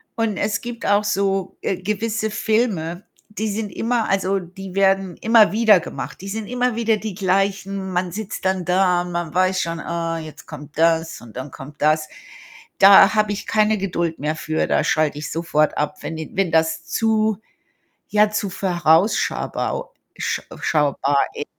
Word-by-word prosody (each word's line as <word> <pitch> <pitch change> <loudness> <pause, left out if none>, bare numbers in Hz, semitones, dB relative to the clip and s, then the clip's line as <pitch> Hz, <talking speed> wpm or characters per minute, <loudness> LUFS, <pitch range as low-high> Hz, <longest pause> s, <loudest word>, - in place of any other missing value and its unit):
und 225 -3 -1
es 215 - -1
gibt 240 -1 -7
auch 205 +1 +3
so, 195 -2 -1
äh, 190 - -1
gewisse 215 +2 -2
Filme, 205 -6 -1 0.2
die 210 +1 -3
sind 210 +1 -3
immer 230 +2 -1
also, 195 0 +1
die 185 +1 -10
werden 195 -2 +2
immer 225 -1 +5
wieder 215 -3 +5
gemacht. 135 -3 -7
Die 195 - -8
sind 210 +1 -4
immer 250 -1 0
wieder 225 -1 +1
die 215 -2 -5
gleichen. 195 0 -1
Man 180 0 -1
sitzt 205 0 -6
dann 190 -1 0
da. 180 0 +2
Man 175 -2 -4
weiß 185 +1 +2
schon: 165 0 -3
„Ah, 165 -1 -3
jetzt 155 -1 -11
kommt 150 -1 -10
das, 165 0 +2
und 120 -1 -12
dann 130 +2 -6
kommt 145 +2 -11
das.“ 155 +1 +2 0.7
Da 195 0 +8
habe 215 -1 +2
ich 205 - -4
keine 215 0 +2
Geduld 175 -4 -2
mehr 150 +3 -1
für. 155 0 -1
Da - - +2
schalte 155 -1 +1
ich 150 - -5
sofort 155 -2 0
ab, 150 0 -1
wenn 165 - -5
die 160 - -7
wenn 190 -3 +1
das 160 -1 +1
zu, 220 -2 +1 0.7
ja 210 0 +3
zu 210 -2 -2
vorausschabau 185 - 0 0.2
sch - - -2 0.2
schaubar 145 -2 +1 0.2
i 145 - -3
190 Hz, 170 wpm, -21 LUFS, 165-210 Hz, 0.7 s, Da